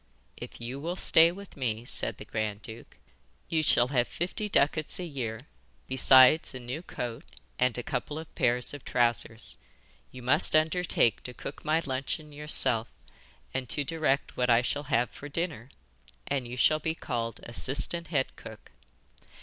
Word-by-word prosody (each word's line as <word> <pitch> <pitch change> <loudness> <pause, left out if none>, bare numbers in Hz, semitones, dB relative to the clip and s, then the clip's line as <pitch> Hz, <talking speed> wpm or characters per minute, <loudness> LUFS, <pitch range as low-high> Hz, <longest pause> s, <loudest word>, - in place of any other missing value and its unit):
'If - - -10
you 120 +3 -6
will 170 +5 -4
stay 165 -2 +6
with 200 +2 -12
me,' 120 -4 -3
said - - +1
the - - -9
grand 105 -1 -4
duke, 110 +1 -11 0.5
'you 160 -1 +1
shall 125 -5 +3
have 125 -3 +1
fifty 210 +5 -3
ducats 155 -2 +2
a - - -3
year, 120 -8 -5 0.5
besides 130 +3 +6
a - - -5
new 125 +6 -6
coat 120 -9 -6 0.4
and 125 -1 +2
a 120 - -4
couple 150 - -4
of 160 -1 -9
pairs 125 +2 0
of 145 - -9
trousers. 120 -2 -1 0.5
You 130 -1 -11
must 150 +7 +3
undertake 155 - +2
to 125 - -8
cook 140 - -8
my 160 +2 +1
luncheon 140 +3 -4
yourself 145 -6 +2 0.7
and 130 -3 -3
to 145 +6 -1
direct 150 -2 -1
what 125 0 0
I 120 +1 +4
shall 145 +3 -2
have 125 -4 +1
for 145 - -10
dinner, 145 -7 -3 0.6
and 135 -3 -2
you 125 +1 -7
shall 155 +4 +4
be 160 +1 -2
called 115 -7 -4
assistant 135 - +2
head 145 -4 -1
cook. - - -12
130 Hz, 165 wpm, -28 LUFS, 120-155 Hz, 0.7 s, stay